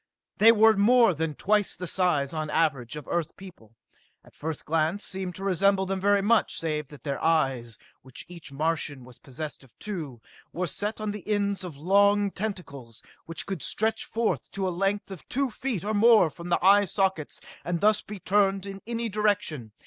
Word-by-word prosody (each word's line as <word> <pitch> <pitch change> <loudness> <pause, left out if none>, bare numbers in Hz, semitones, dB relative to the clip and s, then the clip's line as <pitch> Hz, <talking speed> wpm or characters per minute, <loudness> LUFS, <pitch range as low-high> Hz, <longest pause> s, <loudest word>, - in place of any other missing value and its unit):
They 225 +2 +8
were 220 0 +5
more 230 +1 +5
than 160 -1 -3
twice 210 +3 +1
the 180 - -6
size, 165 -6 +1
on 155 -1 -3
the 150 - -4
average, 140 -6 0
of 150 -3 -8
Earth 170 -2 -2
people, 145 - -14 0.5
and - - -19
at - - -25
first 160 -1 -5
glance 165 +5 0
seemed 185 -2 -4
to 195 - -7
resemble 195 +1 +2
them 190 0 -3
very 200 0 +3
much, 225 +2 +2
save 150 -3 -2
that 145 0 -14
their 140 -2 -3
eyes, 135 -8 +1
of - - -24 0.2
which 130 0 -11
each 170 -5 -11
Martian 150 -2 -2
was 125 -1 -14
possessed 145 +2 -7
of 130 - -22
two, 160 - -6 0.3
were 180 +2 -2
set 205 +7 -3
on 215 -1 -2
the 205 -3 -8
ends 200 -2 0
of 170 -6 -8
long 200 +5 +3
tentacles 140 - -6 0.2
which 165 - -5
could 190 -6 -4
stretch 220 +1 0
forth 225 0 -2
to 195 -1 -2
a - - -1
length 195 +3 -1
of 190 - -10
two 275 -1 0
feet 230 -5 -3
or 215 +1 -2
more 215 -5 +5
from 170 +3 -9
the 175 - +3
eye 200 +1 +6
sockets 190 -5 -1 0.2
and 175 -1 -2
thus 210 +2 +3
be 210 -1 -9
turned 195 +1 +1
in 195 -1 -8
any 235 0 -2
direction. 200 - -1
185 Hz, 200 wpm, -27 LUFS, 155-205 Hz, 0.5 s, They